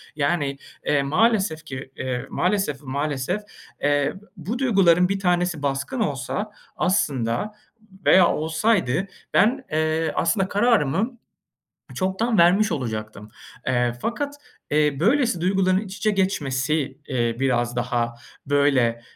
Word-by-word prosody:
Yani, 145 Hz, -1 st, 0 dB, 0.3 s
eee, 140 Hz, -1 st, +2 dB
maalesef 190 Hz, 0 st, +1 dB
ki, 130 Hz, -2 st, -7 dB
eee, 125 Hz, -1 st, -3 dB
maalesef, 180 Hz, -7 st, 0 dB
maalesef, 145 Hz, +6 st, -2 dB, 0.4 s
eee, 145 Hz, 0 st, +2 dB, 0.2 s
bu 200 Hz, +9 st, -4 dB
duyguların 185 Hz, -8 st, +4 dB
bir 195 Hz, 0 st, -1 dB
tanesi 175 Hz, -4 st, 0 dB
baskın 140 Hz, -, -2 dB
olsa 205 Hz, +4 st, -2 dB, 0.3 s
aslında 145 Hz, -, 0 dB, 0.5 s
veya 185 Hz, -2 st, +7 dB
olsaydı 160 Hz, -, +1 dB, 0.3 s
ben, 260 Hz, +5 st, +3 dB
eee, 155 Hz, +1 st, 0 dB
aslında 190 Hz, +2 st, +1 dB
kararımı 220 Hz, -, +1 dB, 0.8 s
çoktan 195 Hz, +4 st, 0 dB
vermiş 190 Hz, +6 st, +5 dB
olacaktım. 110 Hz, -5 st, -4 dB, 0.4 s
Eee, 120 Hz, -2 st, +1 dB
fakat, 285 Hz, +5 st, -2 dB, 0.4 s
eee, 150 Hz, -2 st, +2 dB
böylesi 235 Hz, -, +2 dB
duyguların 185 Hz, 0 st, +2 dB
iç 200 Hz, -2 st, -7 dB
içe 215 Hz, -, +1 dB
geçmesi, 150 Hz, -7 st, 0 dB
eee, 120 Hz, -3 st, 0 dB
biraz 120 Hz, -3 st, 0 dB
daha 120 Hz, -1 st, -1 dB, 0.3 s
böyle, 135 Hz, -5 st, +2 dB
160 Hz, 115 wpm, -23 LUFS, 135-195 Hz, 0.8 s, veya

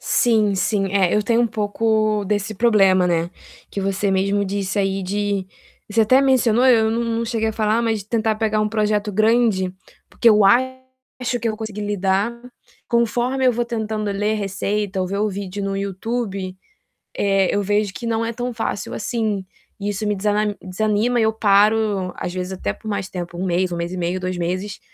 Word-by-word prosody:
Sim, 215 Hz, -4 st, +2 dB
sim. 195 Hz, +1 st, 0 dB
É, 190 Hz, -3 st, +3 dB
eu 210 Hz, -, +2 dB
tenho 230 Hz, +2 st, +2 dB
um 240 Hz, -, +3 dB
pouco 215 Hz, 0 st, 0 dB
desse 205 Hz, +2 st, -1 dB
problema, 195 Hz, -5 st, +4 dB
né, 170 Hz, -1 st, +1 dB, 0.4 s
que 200 Hz, -, -4 dB
você 195 Hz, +1 st, 0 dB
mesmo 200 Hz, +2 st, +1 dB
disse 195 Hz, 0 st, -2 dB
aí 195 Hz, 0 st, 0 dB
de 200 Hz, 0 st, -2 dB, 0.4 s
você 225 Hz, +2 st, +3 dB
até 255 Hz, +5 st, +5 dB
mencionou 250 Hz, -3 st, +3 dB
eu 225 Hz, -3 st, +5 dB
não 230 Hz, +1 st, 0 dB
não 230 Hz, 0 st, -1 dB
cheguei 225 Hz, -1 st, -1 dB
a -, -, -2 dB
falar, 215 Hz, +1 st, +1 dB
mas 220 Hz, -3 st, -1 dB
tentar 220 Hz, 0 st, 0 dB
pegar 215 Hz, -1 st, 0 dB
um 215 Hz, -, +1 dB
projeto 210 Hz, -1 st, 0 dB
grande, 215 Hz, -3 st, +2 dB, 0.3 s
porque 235 Hz, -, +3 dB
eu 210 Hz, -2 st, +5 dB
acho 260 Hz, +2 st, 0 dB
que 230 Hz, -, -1 dB
eu 215 Hz, -, -2 dB
consegui 215 Hz, -2 st, -6 dB
lidar. 200 Hz, +1 st, 0 dB, 0.6 s
Conforme 240 Hz, +3 st, +1 dB
eu 250 Hz, -, +5 dB
vou 240 Hz, +1 st, -1 dB
tentando 220 Hz, -3 st, -3 dB
ler 210 Hz, +2 st, 0 dB
receita 200 Hz, 0 st, -2 dB
ou 185 Hz, -, 0 dB
ver 200 Hz, +2 st, -3 dB
o 215 Hz, +1 st, +1 dB
vídeo 200 Hz, 0 st, -5 dB
no 195 Hz, 0 st, -2 dB
YouTube, 195 Hz, -1 st, -3 dB, 0.6 s
eh, 195 Hz, -1 st, +2 dB
eu 205 Hz, -, +1 dB
vejo 205 Hz, 0 st, +1 dB
que 235 Hz, -, -7 dB
não 230 Hz, 0 st, 0 dB
é 230 Hz, -, -2 dB
tão 245 Hz, +1 st, -4 dB
fácil 225 Hz, -3 st, -3 dB
assim, 215 Hz, -3 st, -2 dB, 0.4 s
e 200 Hz, +1 st, -2 dB
isso 210 Hz, +1 st, -2 dB
me 210 Hz, -, +1 dB
desana 210 Hz, +1 st, 0 dB
desanima, 215 Hz, +5 st, 0 dB
eu 220 Hz, -1 st, +2 dB
paro, 205 Hz, -2 st, +2 dB
às 175 Hz, -, -4 dB
vezes 185 Hz, 0 st, -4 dB
até 185 Hz, -, -2 dB
por 220 Hz, -, -11 dB
mais 200 Hz, -2 st, -3 dB
tempo, 175 Hz, -1 st, -6 dB
1 185 Hz, -, -2 dB
mês, 180 Hz, +1 st, 0 dB
1 -, -, -2 dB
mês 170 Hz, +1 st, -3 dB
e 185 Hz, -, -5 dB
meio, 175 Hz, +1 st, -1 dB
2 185 Hz, 0 st, -3 dB
meses, 185 Hz, +4 st, -3 dB
210 Hz, 195 wpm, -21 LUFS, 195-225 Hz, 0.6 s, até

